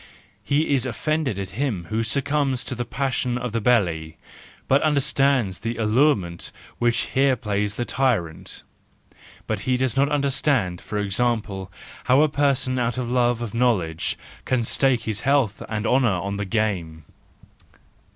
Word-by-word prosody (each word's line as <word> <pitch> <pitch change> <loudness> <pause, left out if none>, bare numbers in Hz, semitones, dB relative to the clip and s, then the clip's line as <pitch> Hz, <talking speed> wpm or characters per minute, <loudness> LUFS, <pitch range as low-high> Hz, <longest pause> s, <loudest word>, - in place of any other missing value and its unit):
He 145 +1 +1
is 130 -1 +1
offended 145 0 -1
at 95 -2 -5
him 110 -6 -2
who 110 +1 +1
succumbs 140 +2 0
to - - -5
the 120 -1 -3
passion 130 -1 -1
of 125 -1 -3
the 115 +1 -1
belly, 85 -9 +1 0.5
but 135 +2 +4
he - - +3
understands 135 -7 +2
the 115 0 -3
allurement 110 - +1 0.3
which 120 -1 +2
here 135 0 +4
plays 105 -3 -2
the 120 - -2
tyrant; 115 -14 -1 0.8
but 110 -2 -2
he 125 +5 0
does 130 -3 0
not 140 +1 +3
understand, 135 - 0
for 105 - -5
example, 105 -2 -1 0.3
how 130 +4 +5
a 155 - +3
person 140 -3 +1
out 120 0 -1
of 120 -2 -2
love 120 -1 +2
of 110 - -6
knowledge 105 -10 0 0.3
can 125 -2 0
stake 130 +1 +2
his 110 -1 -2
health 135 -7 +1
and 105 0 -2
honour 125 -1 +3
on 100 +1 -2
the 105 - -2
game. 90 -7 -2
120 Hz, 155 wpm, -23 LUFS, 105-135 Hz, 0.8 s, how